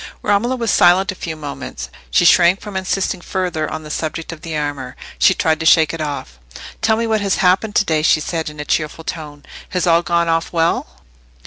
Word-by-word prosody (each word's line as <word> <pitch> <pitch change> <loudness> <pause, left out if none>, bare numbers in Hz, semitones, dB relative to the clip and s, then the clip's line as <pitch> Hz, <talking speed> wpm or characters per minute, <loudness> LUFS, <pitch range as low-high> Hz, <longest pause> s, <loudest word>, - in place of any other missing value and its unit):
Romola 215 +5 +1
was 230 -4 -1
silent 185 +3 +4
a - - -6
few 165 -3 -6
moments. 145 -2 -7 0.2
She 175 - +3
shrank 175 +2 +5
from 210 -2 -9
insisting 190 -1 -1
further 180 -4 -2
on 155 0 -6
the 150 - -8
subject 160 +2 -4
of 165 -2 -10
the 165 -3 -4
armour. 145 -4 -4 0.2
She 190 - +5
tried 160 -2 +1
to 160 - -4
shake 160 -2 +5
it 165 - -5
off. 140 - -5 0.4
"Tell 220 0 +2
me 230 - -1
what 220 -2 0
has 200 -1 +1
happened 195 +3 +1
to 210 - +3
day," 155 -3 +1
she 155 0 +3
said, 160 0 -3
in 150 0 -12
a 150 - -4
cheerful 155 +1 -2
tone. 150 -3 -7 0.2
"Has 180 -1 -1
all 170 -1 +4
gone 170 0 0
off 165 0 0
well?" 165 0 -1
165 Hz, 215 wpm, -18 LUFS, 155-190 Hz, 0.4 s, shrank